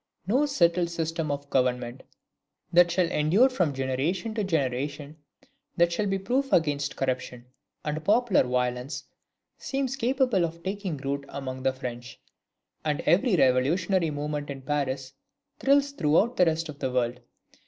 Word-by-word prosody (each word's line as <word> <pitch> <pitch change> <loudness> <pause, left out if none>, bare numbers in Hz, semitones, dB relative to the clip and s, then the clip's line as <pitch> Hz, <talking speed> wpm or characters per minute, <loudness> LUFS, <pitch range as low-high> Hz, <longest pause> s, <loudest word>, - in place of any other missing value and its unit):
No 260 +10 +2
settled 175 -9 +2
system 165 -1 -2
of 145 0 -3
government, 125 -1 0 0.7
that 175 0 +6
shall 175 +1 +2
endure 180 - +4
from 180 - 0
generation 140 - -2
to 215 -1 -1
generation, 145 -2 -2 0.6
that 170 0 +4
shall 205 +4 0
be 195 0 0
proof 255 +8 -1
against 145 -3 +1
corruption 130 -2 -3 0.4
and 155 +1 -3
popular 220 +2 +3
violence, 125 +2 -2 0.6
seems 270 -1 -2
capable 250 -6 +1
of 170 0 -4
taking 190 -4 -3
root 140 +1 -3
among 130 -2 -5
the 130 0 +2
French. 120 -2 -7 0.6
And 150 -2 -1
every 200 +4 +3
revolutionary 165 +6 +2
movement 145 0 -4
in 135 -1 -6
Paris 135 -1 -2 0.5
thrills 280 +1 +3
throughout 200 - +2
the 180 - +4
rest 165 +1 0
of 150 -2 -9
the 130 - -2
world. 125 -1 0
155 Hz, 145 wpm, -27 LUFS, 135-190 Hz, 0.7 s, that